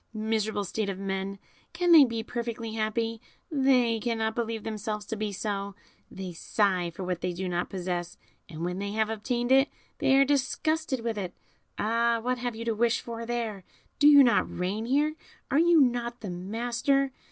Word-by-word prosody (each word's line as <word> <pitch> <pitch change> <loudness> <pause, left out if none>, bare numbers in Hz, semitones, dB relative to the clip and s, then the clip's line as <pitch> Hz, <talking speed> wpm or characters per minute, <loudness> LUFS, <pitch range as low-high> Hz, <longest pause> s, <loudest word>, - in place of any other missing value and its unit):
Miserable 215 -1 -1
state 200 +2 -2
of 195 - -3
men! 195 0 -3 0.4
Can 350 0 +1
they 315 -4 +10
be 230 -2 -3
perfectly 230 -1 -4
happy? 225 +1 -1 0.3
they 255 -5 +3
cannot 225 -1 -1
believe 230 -2 -3
themselves 215 -1 -4
to 225 - -4
be 215 -1 -2
so, 200 0 -3 0.3
they 190 -2 -7
sigh 185 0 0
for 170 +3 -7
what 180 -1 -3
they 180 - -1
do 185 +2 -4
not 175 0 -2
possess, 175 -2 -4 0.3
and 165 0 -5
when 180 +1 -3
they 200 0 -3
have 220 0 0
obtained 240 +3 -2
it 270 +2 +5 0.3
they 265 - +4
are 275 0 +6
disgusted 290 +1 0
with 225 -2 -2
it. 180 -3 -5 0.4
Ah! 230 +2 +2
what 250 +2 -1
have 245 -1 -3
you 230 +1 -6
to 230 - +1
wish 230 +2 +2
for 230 -1 -6
here? 230 -5 -3 0.4
do 290 - +6
you 285 -2 +9
not 240 - +2
reign 200 +5 -2
here? 295 +4 +2 0.4
are 285 - +4
you 340 0 +5
not 240 -2 +1
the 200 -5 -5
master? 240 +9 0
225 Hz, 185 wpm, -28 LUFS, 200-245 Hz, 0.4 s, they